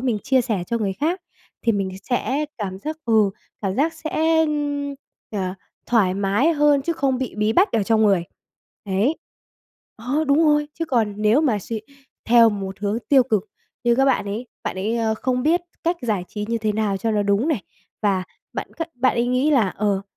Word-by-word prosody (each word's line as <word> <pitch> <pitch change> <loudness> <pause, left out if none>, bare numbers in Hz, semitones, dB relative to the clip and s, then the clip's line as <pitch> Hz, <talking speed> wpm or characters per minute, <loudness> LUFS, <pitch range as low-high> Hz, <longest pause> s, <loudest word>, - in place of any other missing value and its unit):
mình 245 -5 0
chia 260 +4 +2
sẻ 220 -7 -2
cho 235 - -1
người 200 -3 -1
khác, 335 - -1 0.4
thì 230 - +3
mình 195 -2 -1
sẽ 265 +6 -1
cảm 190 -2 -4
giác 310 +9 -5
ừ, 220 -4 +4 0.3
cảm 195 -1 -1
giác 315 +6 +1
sẽ, 320 0 +1 0.8
à, 190 -3 -2 0.3
thoải 205 -6 +3
mái 200 - +2
hơn 295 -2 +3
chứ 335 - 0
không 270 -5 0
bị 260 -3 -4
bí 210 +1 +1
bách 375 - +3
ở 220 - +2
trong 220 +1 +2
người, 195 -5 +3 0.6
đấy. 205 +11 +1 0.8
Ờ, 265 +8 -1
đúng 285 +4 +4
rồi, 295 -1 +3
chứ 330 - -2
còn 225 -8 0
nếu 215 +6 +3
mà 250 -10 +2
suy 220 +3 -5 0.4
theo 230 -1 +6
một 195 -2 -5
hướng 210 +2 0
tiêu 270 -3 +6
cực 215 -4 -1 0.3
như 240 0 +4
các 270 +2 +3
bạn 265 -6 +2
ấy, 215 +5 -4 0.2
bạn - - -3
ấy, 215 +5 -1
ơ, 225 -1 +1
không 250 +2 -1
biết 330 +4 +3 0.2
cách 340 +1 +1
giải 210 -7 -1
trí 210 -1 -4
như 230 0 0
thế 215 -1 0
nào 205 -2 0
cho 225 +4 -1
nó 210 -1 +1
đúng 205 +9 +1
này, 255 - 0 0.4
và 195 -3 +2 0.3
bạn - - -4
c - - -26 0.2
bạn 255 - +3
ấy 235 +1 +2
nghĩ 255 +4 +2
là, 240 -10 +4
ờ, 200 0 -1
230 Hz, 200 wpm, -22 LUFS, 205-275 Hz, 0.8 s, theo